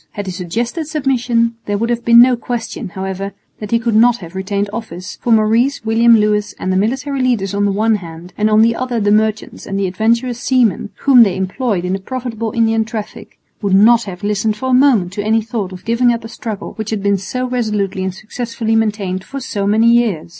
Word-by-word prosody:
Had 205 -2 -5
he 190 - -4
suggested 230 - -3
submission, 245 -6 0
there 205 0 0
would 230 +3 -1
have 235 0 -2
been 235 0 +6
no 250 +1 +6
question, 230 -5 -5
however, 190 +1 -5 0.3
that 210 - -6
he 230 - +3
could 230 0 -1
not 235 +2 +5
have 170 -5 -11
retained 200 +2 -2
office, 205 -4 -7
for 240 - -1
Maurice, 225 +4 +2
William 230 +1 +5
Lewis 210 -1 0
and 185 - -2
the - - 0
military 260 +7 -1
leaders 230 -6 0
on 200 0 +1
the 200 - +1
one 215 +2 +1
hand, 170 -1 -11
and 215 0 +1
on 215 +1 +5
the 230 0 +2
other 250 -2 -2
the 205 -1 +1
merchants 215 0 0
and 195 - -3
the 200 - 0
adventurous 230 +6 0
seamen, 240 -7 +1
whom 265 -3 +6
they 195 -5 +4
employed 190 0 -2
in 180 - -1
the 195 - -2
profitable 230 0 -4
Indian 225 -2 +2
traffic, 220 -1 -8 0.2
would 200 -2 +1
not 230 +4 +5
have 190 0 -8
listened 210 +1 0
for 260 +2 -3
a - - +2
moment 250 -9 +3
to 205 - -3
any 220 +1 +1
thought 220 -4 -4
of 185 -1 -11
giving 235 +2 +2
up 235 -1 -3
a - - -7
struggle 220 -3 -6
which 220 -1 -4
had 215 -3 -3
been 200 -1 +1
so 250 +7 -3
resolutely 210 -6 -2
and 190 -1 -3
successfully 225 +1 -3
maintained 205 -4 -1
for 275 +7 -7
so 205 -6 -3
many 220 +3 +3
years. 225 -10 +1
220 Hz, 220 wpm, -16 LUFS, 200-235 Hz, 0.3 s, been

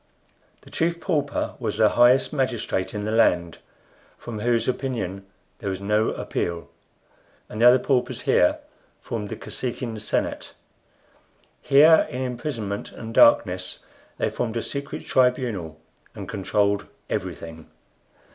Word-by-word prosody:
The - - -17
Chief 170 +1 0
Pauper 150 -6 -1
was 110 -4 -3
the 110 -1 +5
highest 125 +6 +4
magistrate 120 -8 -1
in 105 0 -3
the 110 - -2
land, 90 -7 +2 0.6
from 115 -3 -7
whose 115 +1 +1
opinion 110 -7 -3 0.3
there 100 - -3
was 95 -1 -3
no 105 +2 +1
appeal, 85 -1 -4 0.8
and 110 - -6
the 120 - +8
other 125 +1 +8
paupers 125 -1 0
here - - +3 0.4
formed 105 -3 -5
the - - -4
Kosekin 120 -3 -5
senate. 105 - -2 1.1
Here, 155 +4 +6
in 125 +2 -4
imprisonment 120 -5 -4
and 115 0 -8
darkness, 95 -6 +4 0.4
they - - -1
formed 120 -1 -3
a 115 - -2
secret 140 0 -5
tribunal 120 - 0 0.4
and - - -7
controlled 100 0 0 0.2
everything. 80 -1 -5
115 Hz, 130 wpm, -24 LUFS, 100-125 Hz, 1.1 s, the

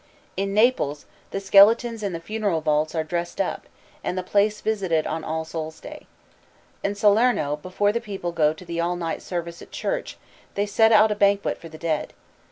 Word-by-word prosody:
In 195 +1 -2
Naples 210 - +2 0.2
the 195 - -3
skeletons 215 +4 +5
in 200 -2 -2
the 165 - -4
funeral 205 -2 -1
vaults 155 +1 0
are 160 - 0
dressed 170 +2 -4
up, 195 - -2 0.4
and 180 - -2
the 185 - -1
place 210 +3 +1
visited 190 -8 0
on 160 0 -3
All 160 +1 -3
Souls' 160 -1 -6
Day. - - -11 0.8
In 200 0 -1
Salerno 205 - +3
before 185 +6 0
the 235 +2 -2
people 195 -5 -5
go 155 -3 +2
to 160 +4 -11
the 170 0 -4
all 175 +1 0
night 170 -2 -3
service 170 -1 -5
at - - -12
church - - -3 0.4
they 205 - +1
set 220 +2 +3
out 215 0 +6
a - - 0
banquet 200 -1 +2
for 165 - -10
the 160 - -11
dead. 160 -2 -2
185 Hz, 190 wpm, -24 LUFS, 165-210 Hz, 0.8 s, out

